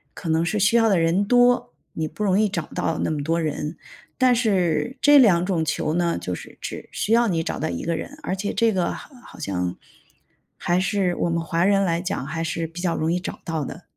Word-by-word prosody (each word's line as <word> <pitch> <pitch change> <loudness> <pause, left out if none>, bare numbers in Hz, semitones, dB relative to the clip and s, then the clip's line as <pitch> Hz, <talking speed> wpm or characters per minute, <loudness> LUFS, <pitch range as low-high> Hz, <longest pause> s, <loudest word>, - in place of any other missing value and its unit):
可 175 - -8
能 160 +1 +2
是 210 - -1
需 200 +5 +3
要 225 -1 +4
的 190 - +3
人 165 +5 +2
多， 245 +2 +3 0.2
你 160 -1 -2
不 210 - -6
容 195 0 +3
易 215 -2 +3
找 170 -5 -2
到 160 - -1
那 - - 0
么 150 -2 -2
多 165 +2 0
人。 155 +1 -3 0.4
但 255 -2 +4
是 195 - 0
这 290 -1 +7
两 180 -8 +5
种 175 -4 0
球 155 0 -1
呢， 170 -1 +1
就 90 - -4
是 - - -9
只 - - -7
需 220 - -1
要 235 0 +4
你 165 -4 0
找 - - -4
到 - - -2
一 85 - -4
个 170 0 -1
人， 290 - -7
而 190 - -2
且 200 +2 -3
这 225 -2 +2
个 180 -2 0
好 - - -10
好 - - -14
像 90 -2 -3 0.8
还 175 +1 +1
是 190 -2 0
我 170 - -1
们 170 0 0
华 165 +1 0
人 195 0 +3
来 170 -2 0
讲， 180 -7 -3
还 165 +2 -3
是 165 0 -2
比 170 +2 -8
较 170 -3 0
容 160 +2 0
易 180 - 0
找 - - -6
到 160 -3 -2
的。 165 +5 -9
175 Hz, 260 characters per minute, -23 LUFS, 165-205 Hz, 0.8 s, 这